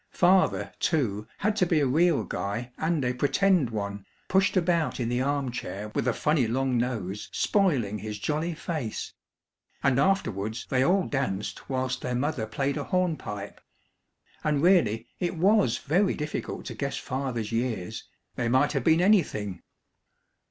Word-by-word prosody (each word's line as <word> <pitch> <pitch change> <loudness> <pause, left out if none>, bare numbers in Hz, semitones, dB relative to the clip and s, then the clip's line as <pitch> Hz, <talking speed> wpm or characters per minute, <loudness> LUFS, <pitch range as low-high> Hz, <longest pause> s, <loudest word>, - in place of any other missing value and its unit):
Father, 185 +1 +3
too, 110 - 0
had 210 +1 0
to 185 - +4
be 165 -2 +3
a 145 - +2
real 155 0 +3
guy 100 +7 -4
and 160 -4 0
a 125 - +1
"pretend" 150 - +2
one, 100 -2 -4 0.3
pushed 190 +1 +3
about 170 -4 +1
in 120 -2 -1
the 120 +1 0
arm 140 -1 0
chair 105 -3 -5
with - - -1
a - - +4
funny 150 -4 +1
long 130 +2 0
nose 110 -5 -2
spoiling 135 - +1
his 105 -1 -5
jolly 155 +9 -2
face. 155 - -4 0.7
And 135 -1 +3
afterwards 115 - 0
they 130 -1 +3
all 185 +5 +3
danced 110 -8 -3
whilst 130 -1 -1
their 125 0 -2
mother 130 -3 -1
played 135 +5 -1
a - - -3
hornpipe 155 - -2 0.8
and 150 -1 +1
really 120 - +4
it 175 -2 -2
was 190 - +3
very 185 +7 +1
difficult 150 0 -4
to - - -5
guess 140 -1 -3
Father's 130 -5 -3
years, 115 -6 -2 0.3
they 125 - -2
might 130 +4 +3
have 135 -4 -1
been 160 +4 +4
anything! 110 - +2
135 Hz, 155 wpm, -27 LUFS, 115-165 Hz, 0.8 s, to